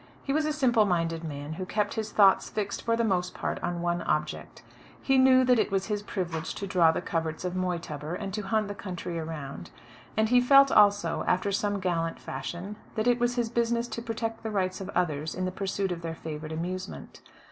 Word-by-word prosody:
He 275 - -1
was 310 +1 +2
a 305 - +1
simple 255 -7 +3
minded 165 -3 0
man, 145 -1 -5
who 185 +3 -5
kept 210 0 0
his 220 -1 -3
thoughts 195 -2 +5
fixed 200 -2 -3
for 230 -1 +1
the 230 - +2
most 180 -4 0
part - - -3
on 175 0 -2
one 175 0 0
object. 150 0 -2 0.4
He 270 -1 +3
knew 260 0 +6
that 250 -2 +4
it - - +2
was 195 -1 0
his 210 -2 -2
privilege 170 -6 -4
to 200 - -4
draw 180 -4 +4
the 160 - -3
coverts 165 -1 -2
of 180 - -2
Moytubber, 170 -4 -3
and 195 0 -5
to 210 - -2
hunt 215 +1 0
the 205 - -4
country 180 -4 -5
around; 145 - -6 0.5
and 220 0 +3
he 250 0 +5
felt 275 +2 +7
also, 205 -5 +4
after 185 +3 +1
some 205 0 0
gallant 165 -3 -1
fashion, 190 +5 -6 0.2
that 215 - 0
it 245 0 +3
was 240 0 +1
his 240 -2 0
business 235 0 0
to 235 +1 -4
protect 225 -1 -4
the 225 - -4
rights 190 -2 -1
of 195 - -6
others 155 -3 0
in 185 - -2
the 185 - -1
pursuit 195 0 -2
of 170 -1 -4
their 165 -1 -4
favourite 155 -1 -6
amusement. 185 +4 -5
190 Hz, 215 wpm, -28 LUFS, 170-220 Hz, 0.5 s, felt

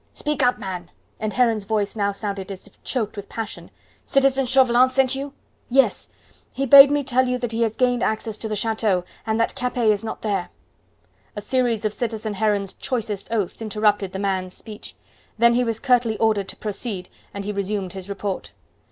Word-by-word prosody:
"Speak 300 -2 -2
up, 250 -1 +3
man!" 180 -4 -6 0.3
and 215 -1 -2
Heron's 230 -4 +2
voice 210 -1 -1
now 200 -2 +1
sounded 200 -1 -5
as 190 - -8
if 205 - -18
choked 225 -5 -2
with 205 -1 -8
passion. 225 -1 -6 0.3
"Citizen 270 -1 +2
Chauvelin 255 -1 +5
sent 265 0 +3
you?" 275 +1 -4 0.4
"Yes. 270 +2 +2 0.4
He 275 - -2
bade 275 +1 +10
me 290 0 +1
tell 260 -1 +2
you 250 - 0
that 240 -2 -3
he 230 +1 -2
has 225 -1 +1
gained 245 -2 +2
access 220 -1 -1
to 220 - -3
the 215 - -2
chateau, 215 -3 0 0.2
and 220 +1 0
that 230 - +1
Capet 245 -2 0
is 205 0 -1
not 220 - -6
there." 200 -4 -1 0.9
A 205 - -4
series 235 -2 0
of 210 - 0
citizen 220 -2 -3
Heron's 205 -2 0
choicest 215 -6 -3
oaths 220 -2 -2
interrupted 210 -2 +1
the 190 - -5
man's 190 -2 -2
speech. 215 -2 -10 0.4
Then 235 +1 +5
he 250 +1 +2
was 230 -2 -1
curtly 245 -4 +2
ordered 215 -3 +1
to - - -7
proceed, 205 -3 -4 0.2
and 200 0 -6
he 210 - -2
resumed 200 -2 -3
his 190 0 -8
report. 200 -1 -4
220 Hz, 190 wpm, -23 LUFS, 200-245 Hz, 0.9 s, bade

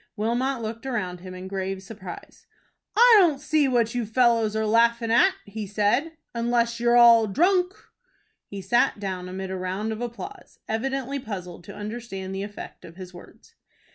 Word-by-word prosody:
Wilmot 235 +3 -1
looked 230 +4 -6
around 185 -8 -3
him 185 +1 -9
in 185 +1 -8
grave 190 0 -4
surprise. 195 -4 -11 0.5
"I 475 -1 +8
don't 325 -7 +3
see 305 -1 +2
what 235 -3 +1
you 245 -1 -1
fellows 230 -2 +2
are 220 0 0
laughing 230 +1 +2
at," 375 +10 +4
he 210 0 -6
said, 210 +11 +1 0.2
"unless 235 0 0
you're 240 0 +3
all 230 -2 +7
drunk." 360 - +2 0.7
He 200 -1 -8
sat 235 +2 +2
down 185 -2 -4
amid 190 +1 -5
a - - -3
round 190 +4 -3
of 220 +1 -5
applause, 310 - -8
evidently 270 +4 -2
puzzled 180 -7 -7
to 200 - -10
understand 205 -3 -6
the 195 - -4
effect 205 +1 -8
of 165 - -12
his 185 0 -10
words. 175 - -15
225 Hz, 170 wpm, -25 LUFS, 195-245 Hz, 0.7 s, I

